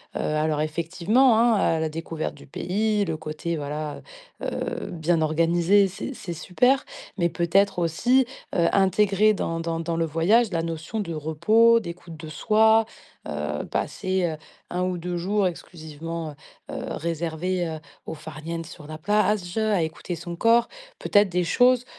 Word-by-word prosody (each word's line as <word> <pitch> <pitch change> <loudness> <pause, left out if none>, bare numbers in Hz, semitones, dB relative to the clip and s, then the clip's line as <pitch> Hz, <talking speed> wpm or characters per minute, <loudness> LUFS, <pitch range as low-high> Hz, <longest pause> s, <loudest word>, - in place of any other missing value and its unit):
heu, - - -2
alors 155 0 0
effectivement, 180 - +2
hein, 235 0 +5
à 165 -5 +2
la 160 - -1
découverte 165 0 -4
du - - -14
pays, 210 +8 0
le 160 -2 -3
côté, 160 +2 -4
voilà, 150 +1 -4 0.4
heu, - - -3
bien 165 0 +1
organisé, 170 +5 +3
c'est 195 +8 -6
c'est 180 -8 -6
super. 250 - +2 0.3
Mais 170 -1 +2
peut-être, 180 +3 +2
aussi, 240 +11 +3 0.3
heu, 170 -1 +3
intégrer 200 +2 +4
dans 165 -4 -2
dans 165 0 -2
dans 165 0 -2
le 165 - +1
voyage, 195 +9 +3
la 165 -2 0
notion 165 +6 -4
de 170 -5 -3
repos, 215 +10 +4
d'écoute 170 -4 -8
de 155 - -9
soi, 220 +7 +4 0.4
heu, 75 0 -3
passer, 185 -1 -1
heu, 155 - -7 0.3
1 180 +1 -1
ou 185 -1 -1
2 175 +1 -3
jours 195 +3 +1
exclusivement, 165 -2 -6 0.4
heu - - -7
heu, - - -4
réservés, 170 +2 -2
heu, 160 -1 -5 0.3
au - - -5
farniente 165 +2 -6
sur 155 - -11
la 155 - -7
plage, 205 -1 +1
à 215 -5 +2
écouter 160 +2 -5
son 170 +1 -7
corps. 230 +5 +4 0.3
Peut-être 205 -1 +3
des 180 0 0
choses, 245 +7 +3
170 Hz, 160 wpm, -25 LUFS, 160-205 Hz, 0.4 s, hein